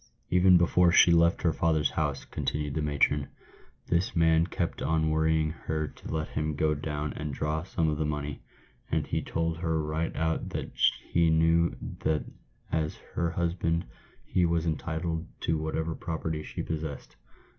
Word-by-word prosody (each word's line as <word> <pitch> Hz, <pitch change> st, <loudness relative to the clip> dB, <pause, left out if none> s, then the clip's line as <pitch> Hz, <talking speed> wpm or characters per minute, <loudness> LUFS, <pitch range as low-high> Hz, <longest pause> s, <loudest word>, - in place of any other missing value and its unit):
" -, -, -42 dB
Even 90 Hz, 0 st, +6 dB
before 85 Hz, 0 st, +4 dB
she 85 Hz, -, +7 dB
left 85 Hz, +1 st, +4 dB
her 85 Hz, -2 st, +3 dB
father's 80 Hz, -4 st, +1 dB
house," 75 Hz, -2 st, -2 dB
continued 75 Hz, -1 st, -3 dB
the 80 Hz, -, -1 dB
matron, 75 Hz, -1 st, +1 dB, 0.3 s
" -, -, -30 dB
this 85 Hz, +1 st, +1 dB
man 80 Hz, 0 st, +4 dB
kept 85 Hz, -2 st, -3 dB
on 80 Hz, +1 st, +1 dB
worrying 80 Hz, 0 st, +2 dB
her 80 Hz, -1 st, -3 dB
to -, -, -10 dB
let 80 Hz, -1 st, -2 dB
him 75 Hz, -1 st, -2 dB
go 75 Hz, +1 st, +2 dB
down 75 Hz, 0 st, -3 dB
and 75 Hz, -2 st, -4 dB
draw 75 Hz, +1 st, -1 dB
some 85 Hz, -2 st, -1 dB
of 75 Hz, -1 st, -1 dB
the 80 Hz, -, +1 dB
money; 75 Hz, -1 st, -4 dB, 0.5 s
and -, -, 0 dB
he -, -, -1 dB
told 80 Hz, 0 st, -2 dB
her 80 Hz, -1 st, 0 dB
right 80 Hz, +2 st, -2 dB
out 80 Hz, 0 st, -1 dB
that -, -, -4 dB, 0.4 s
he 85 Hz, -1 st, +4 dB
knew 80 Hz, +1 st, +3 dB, 0.2 s
that 80 Hz, -1 st, 0 dB, 0.5 s
as 80 Hz, -1 st, 0 dB, 0.2 s
her 85 Hz, -1 st, 0 dB
hus 85 Hz, 0 st, 0 dB
band 85 Hz, -1 st, 0 dB, 0.4 s
he 90 Hz, -, +1 dB
was 85 Hz, -1 st, +1 dB
entitled 80 Hz, +1 st, -2 dB
to 80 Hz, -1 st, 0 dB
whatever 80 Hz, +1 st, -2 dB
property 80 Hz, -1 st, -3 dB
she -, -, -5 dB
possessed. 80 Hz, -3 st, -5 dB
80 Hz, 175 wpm, -28 LUFS, 75-85 Hz, 0.5 s, she